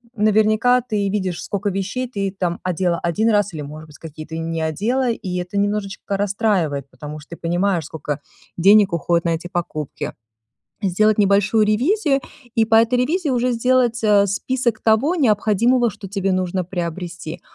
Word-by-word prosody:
наверняка 215 +3 +3
ты 210 -5 -1
видишь, 190 -4 -2
скока 200 0 -2
вещей 200 +7 -3
ты 200 -5 -2
там 175 -2 -1
одела 175 -1 0
1 215 +7 +1
раз 205 -1 +2
или, 150 - -4
может 155 +2 -9
быть, 150 - -15
какие-то 160 0 -9
и - - -3
не 165 0 -3
одела, 235 - 0
и 180 -5 -4
это 180 +3 -4
немножечко 200 -1 -2
расстраивает, 195 - 0
потому 150 +3 -8
что 150 - -16
ты - - -19
понимаешь, 175 -1 0
скока 150 -2 -5 0.4
денег 200 +1 +5
уходит 170 +1 0
на 170 - +2
эти 175 +2 -7
покупки. 155 -4 -4 0.7
Сделать 215 +3 +2
небольшую 205 +2 +3
ревизию, 275 - +2 0.4
и 225 - +4
по 225 0 +1
этой 230 +2 +4
ревизии 315 +6 0
уже 250 0 +1
сделать, 240 -1 +2
а, 205 -1 +5
список 235 +3 -1
того 230 +10 +2
необходимого, 235 - +2
что 200 -1 -10
тебе 195 -1 -1
нужно 185 0 -1
приобрести. 170 -2 -5
200 Hz, 165 wpm, -20 LUFS, 175-225 Hz, 0.7 s, денег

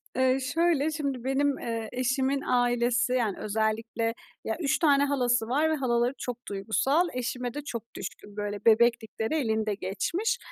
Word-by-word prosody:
Eee, 260 +1 +3
şöyle, 325 -3 +2
şimdi 280 -5 -3
benim, 275 +1 +1
eee, 230 -2 -4
eşimin 265 +2 0
ailesi, 245 0 +2
yani, 225 -6 0
özellikle, 220 +2 -1 0.3
ya, 220 - -2
3 280 -5 +1
tane 285 -4 +4
halası 245 -5 +1
var 300 +6 +2
ve 315 - +2
halaları 245 -2 +1
çok 245 -2 -4
duygusal, 245 - +1
eşime 250 -1 -3
de 295 - -4
çok 235 -5 -7
düşkün, 205 0 -8
böyle, 205 0 -4
bebeklikleri 225 +2 +3
elinde 220 -6 0
geçmiş. 335 - -1
245 Hz, 150 wpm, -28 LUFS, 225-280 Hz, 0.3 s, tane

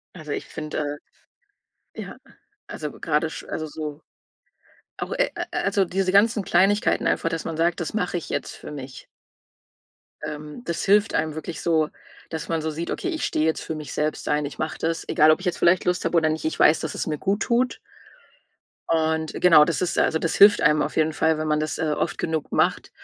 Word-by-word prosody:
Also, 155 -4 -7
ich - - -4
finde, 150 -1 -4 1.0
äh - - -6
ja, - - -9 0.5
also 150 -1 -5
grade 155 0 0
sch 150 - -8
also 155 - -4
so 150 -1 -6 1.0
auch, - - -5
äh - - +1
äh - - -3
also 195 -2 +1
diese 185 +1 -1
ganzen 210 +1 +4
Kleinigkeiten 195 +4 +2
einfach, 165 - +1
dass 165 -1 -4
man 165 -1 -4
sagt: 170 +1 +1
„Das 170 - -4
mache 180 -4 -1
ich 170 - -5
jetzt - - -3
für - - -10
mich.“ 135 -2 -9 1.2
Ähm, 150 +8 -7
das 170 - -2
hilft 205 +2 +3
einem 155 -1 0
wirklich 160 +1 -6
so, 160 -2 +2 0.4
dass 160 -1 -5
man 165 -2 -1
so 160 - -2
sieht: 165 +3 -4
„Okay, 365 - -3
ich 325 -4 -2
stehe 155 - 0
jetzt 160 - 0
für 160 - -4
mich 150 -1 -7
selbst 150 0 -2
ein, 150 0 +1
ich 145 - -7
mache 155 - -3
das, 165 0 -2
egal 155 +1 +5
ob 155 - +3
ich 185 - -8
jetzt 175 - 0
vielleicht 175 +1 +4
Lust 180 0 0
habe - - 0
oder 160 -1 +4
nicht, 155 0 -3
ich 160 - -2
weiß, 155 - +5
dass 160 - -4
es - - -2
mir 150 -2 -2
gut 200 +5 0
tut.“ 245 +2 +1 1.1
Und 160 -1 +1
genau, 160 -4 +7
das 165 - -1
ist 180 - -1
also 160 - +2
das 165 - -1
hilft 205 +1 +7
einem 150 0 +4
auf - - -2
jeden 155 0 +2
Fall, 160 0 +2
wenn 155 0 -3
man 150 0 +1
das, 155 -3 -2
äh, - - -3
oft - - -1
genug 160 -2 -3
macht, - - +1
160 Hz, 215 wpm, -24 LUFS, 155-180 Hz, 1.2 s, genau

